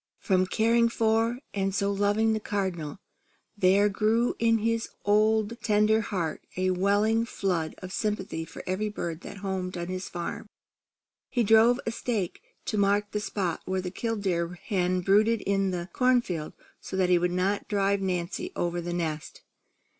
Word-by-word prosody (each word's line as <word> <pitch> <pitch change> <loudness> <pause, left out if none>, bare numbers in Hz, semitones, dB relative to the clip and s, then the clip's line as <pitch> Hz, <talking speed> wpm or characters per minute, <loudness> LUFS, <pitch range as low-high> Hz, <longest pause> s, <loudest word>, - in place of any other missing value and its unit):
From 185 -3 +1
caring 230 +4 +3
for 225 +1 +1 0.2
and 195 -1 -1
so 200 0 +1
loving 205 +2 +2
the 220 - 0
Cardinal, 190 -8 -3 0.6
there 200 +1 +4
grew 220 +4 +1
in 230 0 +4
his 230 +1 -1 0.2
tender 215 0 +3
old 220 - +2
heart 170 -6 -2 0.2
a 185 0 +2
welling 205 +5 +2
flood 180 -8 -2
of 185 0 -6
sympathy 205 -6 -2
for 160 - -10
every 195 +4 -1
bird 170 -5 -5
that - - -9
homed 185 -1 -3
on 175 0 -4
his 185 0 -4
farm. 175 +4 -5 0.8
He 245 - +1
drove 225 +3 +5
a 225 - -1
stake 220 -6 -3 0.2
to 215 - -1
mark 205 +1 +2
the 210 - -1
spot 190 -5 -2
where 190 0 -1
the 180 -1 -4
killdeer 190 -6 -2
hen 185 -3 0
brooded 210 +4 +3
in 195 -1 +1
the 175 -1 -3
corn 250 -1 +3
field, 160 -7 -4 0.3
so 190 - -6
that 185 -1 +2
he 180 -1 +5
would 175 +1 +1
not 185 +3 0
drive 200 -1 +1
Nancy 185 - -2
over 175 0 -1
the 175 0 -4
nest. 160 -3 -4
200 Hz, 165 wpm, -27 LUFS, 180-220 Hz, 0.8 s, drove